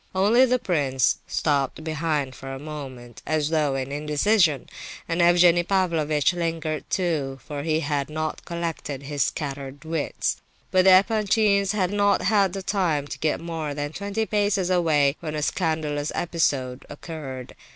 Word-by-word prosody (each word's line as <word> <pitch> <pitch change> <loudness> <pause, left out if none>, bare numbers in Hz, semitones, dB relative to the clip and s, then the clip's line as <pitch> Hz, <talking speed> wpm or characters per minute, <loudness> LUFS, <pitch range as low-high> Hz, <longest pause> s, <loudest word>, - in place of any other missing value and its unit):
Only 215 +7 +5
the 250 +1 +3
prince 140 - +1
stopped 145 0 0
behind 155 -4 -1
for 135 +1 -8
a 135 - -5
moment, 135 -5 -8
as 155 -1 0
though 150 -4 +1
in 135 0 -3
indecision; 150 - +2 0.4
and 170 +1 0
Evgenie 175 0 +5
Pavlovitch 170 -5 +1
lingered 165 -3 -3
too, 150 -8 -1
for 145 -2 -5
he 155 +1 0
had 145 -2 -1
not 155 +1 -3
collected 165 -5 -4
his 140 -1 0
scattered 140 -1 -5
wits. 160 -2 -1 0.3
But 185 0 +4
the 190 - +8
Epanchins 205 -1 +2
had 190 -3 0
not 205 -1 +2
had 195 -1 +1
time 175 -8 0
to - - -6
get 155 - 0
more 160 -3 -4
than 145 +1 -4
twenty 200 +4 -2
paces 205 -3 +1
away 155 -5 +3
when 155 -2 -5
a 150 - -2
scandalous 155 -3 -1
episode 140 -7 -1
occurred. 145 -4 -7
160 Hz, 150 wpm, -24 LUFS, 145-185 Hz, 0.4 s, the